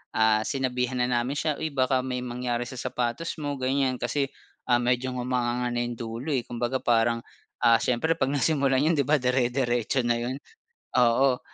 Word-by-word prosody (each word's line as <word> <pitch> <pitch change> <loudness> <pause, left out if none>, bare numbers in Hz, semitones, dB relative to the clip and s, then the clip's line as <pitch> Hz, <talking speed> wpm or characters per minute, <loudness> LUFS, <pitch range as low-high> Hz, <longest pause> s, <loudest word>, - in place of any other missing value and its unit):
ah, 110 -1 +4
sinabihan 125 -1 -1
na - - +1
namin 120 +4 0
siya, 155 -2 -1
"Uy 160 - -1
baka 130 -1 +2
may 125 -1 -3
mangyari 120 -1 -2
sa 130 - -8
sapatos 125 +5 -2
mo," 145 -1 -2
ganyan 130 -1 0
kasi 135 +3 0 0.4
ah, 120 - +5
medyo 125 +1 0
ngumanganga 125 -1 -1
na 120 - 0
yung 120 -1 -4
dulo, 115 +6 -4
eh. 120 - 0
Kumbaga 120 +2 -2
parang 115 0 +3 0.4
ah, 115 -1 +7
siyempre 145 +7 +1
'pag 135 -3 0
nasimulan 140 -1 +2
yun 165 - +3
'di 140 - +2
ba, 155 0 +4
dire-diretso 125 -1 +1
na 120 - +3
yun, 125 +3 -3 0.6
oo. 125 +1 +4
125 Hz, 175 wpm, -26 LUFS, 120-135 Hz, 0.6 s, ah